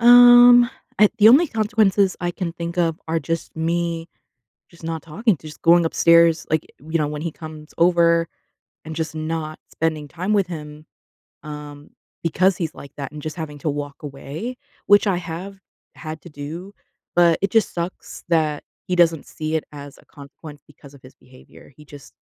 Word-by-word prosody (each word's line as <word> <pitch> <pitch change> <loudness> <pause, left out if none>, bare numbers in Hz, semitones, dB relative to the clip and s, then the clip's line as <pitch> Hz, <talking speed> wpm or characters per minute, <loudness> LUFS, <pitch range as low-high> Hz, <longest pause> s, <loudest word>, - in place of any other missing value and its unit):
Um, 245 0 +8 0.3
I 210 -1 +7
the 215 - +8
only 285 +9 +6
consequences 210 -4 +1
I 175 0 -1
can 175 -2 -4
think 170 +1 -6
of 165 -2 +1
are 165 0 +1
just 165 0 -4
me, 165 0 -2 0.6
just 170 -1 -19
not 165 -1 -4
talking, 180 +5 0
just 155 -1 -12
going 170 0 +5
upstairs, 170 0 +4
like, 155 0 0
w 160 +4 -12
you 165 - +2
know, 150 - 0
when 150 0 -5
he 170 -1 -3
comes 155 -1 -11
over 170 -1 +3 0.6
and 160 0 -7
just 160 -1 -3
not 155 0 -4
spending 155 -2 -2
time 185 +7 -3
with 200 -4 +2
him, 150 -2 -9 0.6
um, 150 -1 -9 0.3
because 180 +3 +2
he's 165 -3 -4
like 140 - -12
that 140 0 -6
and 150 -1 -9
just 155 +2 -6
having 150 -3 -6
to 150 +2 -2
walk 145 0 -6
away. 150 - -7 0.3
Which 205 +1 +5
I 195 - +2
have 180 +3 -7 0.4
had 155 -1 -8
to - - -11
do, 165 +8 -8 0.4
but 170 -2 +5
it 195 - +1
just 225 -1 +1
sucks 170 +1 -6
that 155 -3 0 0.2
he 180 - 0
doesn't 165 -3 +3
see 155 0 -5
it 155 - -3
as 145 -1 -10
a - - -21
consequence 145 +1 -13
because 140 -1 -17
of 135 - -17
his 130 - -15
behavior, 130 +2 -18
he 150 - -15
just, 145 -2 -14
165 Hz, 185 wpm, -21 LUFS, 150-180 Hz, 0.6 s, Um